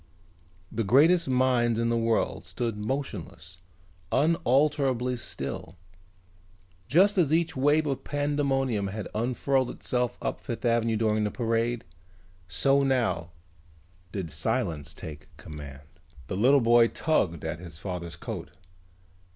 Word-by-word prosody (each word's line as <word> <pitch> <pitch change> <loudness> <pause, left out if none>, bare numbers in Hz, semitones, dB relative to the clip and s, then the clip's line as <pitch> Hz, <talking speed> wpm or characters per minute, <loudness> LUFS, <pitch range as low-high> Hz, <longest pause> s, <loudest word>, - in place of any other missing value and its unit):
The 115 - -1
greatest 155 - +4
minds 125 -3 +2
in 115 0 +1
the 115 - +1
world 115 -1 0
stood 115 -3 -3
motionless, 105 - -5 0.5
unalterably 140 -4 +2
still. 95 -7 -5 1.1
Just 195 +6 +4
as 155 -5 +3
each 165 +1 +1
wave 145 +4 +3
of 135 -2 -2
pandemonium 140 -7 0
had 105 +2 -5
unfurled 125 +3 0
itself 125 -1 -2
up - - -3
Fifth 120 +1 -5
Avenue 115 -1 +2
during 110 -1 +1
the 105 - 0
parade, 115 0 -1 0.6
so 135 - +2
now 125 -11 0 0.8
did 90 -6 -4
silence 75 -1 -1
take 75 -1 -9
command. 70 -2 -9 0.4
The 80 - -4
little 130 +7 +5
boy 120 0 +5
tugged 90 - 0
at 80 +1 -3
his 85 -3 -9
father's 90 -2 -5
coat. - - -6
120 Hz, 120 wpm, -27 LUFS, 100-135 Hz, 1.1 s, little